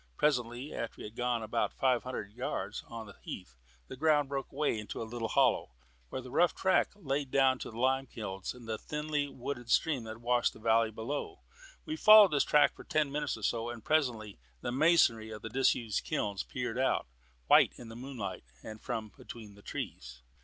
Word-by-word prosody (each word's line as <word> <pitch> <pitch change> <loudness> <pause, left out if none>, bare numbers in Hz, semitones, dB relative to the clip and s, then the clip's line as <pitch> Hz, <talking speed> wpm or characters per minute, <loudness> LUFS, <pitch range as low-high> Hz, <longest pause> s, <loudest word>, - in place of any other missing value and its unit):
Presently, 125 -1 0
after 115 - -4
we - - -9
had 105 +1 -9
gone 120 -2 0
about 115 +2 0
five 130 -2 +2
hundred 125 -5 -5
yards - - -4
on 115 -1 -7
the 100 - -13
heath, 90 -10 -8 0.3
the - - -7
ground 145 0 +3
broke 135 -1 -4
away 140 -5 0
into 105 - -6
a - - -2
little 115 0 -4
hollow, 65 - +2 0.3
where 130 - -5
a - - -9
rough 165 +7 +2
track 190 0 +3
led 140 -7 -2
down 130 -1 +3
to - - -6
the 115 - -10
Lime 130 +2 +1
Kilns 95 -2 -5
and 120 -2 -12
the 110 -1 -3
thinly 150 -1 -2
wooded 120 -2 -6
stream 145 -7 +2
that 110 0 -7
washed 120 +1 +1
the - - -14
valley 115 0 +3
below. 140 - -5 0.4
We 315 - -3
followed 215 - +9
this 145 -2 +3
track 150 - +4
for - - -12
ten 150 -2 0
minutes 150 -4 -2
or 110 - -11
so, 115 +2 0
and 120 -2 -8
presently 120 - 0 0.2
the - - -2
masonry 130 -6 +4
of 110 -2 -8
the 115 - -5
disused 120 -3 +1
kilns 105 - -2
peered - - -4
out, - - +1 0.4
white - - +6
in 120 - -10
the 115 - -9
moonlight, 120 - -6 0.3
from 110 -1 -4
between 110 -3 -10
the 100 - -16
trees. 60 -9 -7
120 Hz, 195 wpm, -32 LUFS, 110-140 Hz, 0.4 s, followed